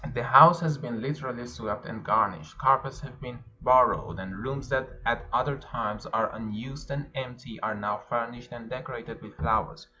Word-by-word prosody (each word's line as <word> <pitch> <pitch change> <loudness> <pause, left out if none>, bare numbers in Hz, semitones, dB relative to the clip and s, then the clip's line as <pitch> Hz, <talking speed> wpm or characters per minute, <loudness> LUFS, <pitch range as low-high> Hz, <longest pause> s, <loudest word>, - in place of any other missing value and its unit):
The - - -1
house 170 +2 +10
has 155 -4 -1
been 120 -6 -5
literally 130 -2 -5
swept 110 -3 -6
and - - -8
garnished. 80 0 +1
Carpets 135 0 +2
have 130 -2 -12
been 125 -1 -10 0.2
borrowed, 125 0 +4
and 95 0 -7
rooms 135 +7 -5
that 130 -1 0 0.2
at 120 0 0
other 140 -1 0
times 105 -5 -5
are 110 -1 0
unused 115 +6 -8
and 145 +1 -5
empty 125 -4 -8
are 110 - -2
now 105 0 -2
furnished 120 +1 -4
and 120 -1 -10
decorated 130 +2 -8
with - - -14
flowers. - - -1
125 Hz, 175 wpm, -28 LUFS, 110-135 Hz, 0.2 s, house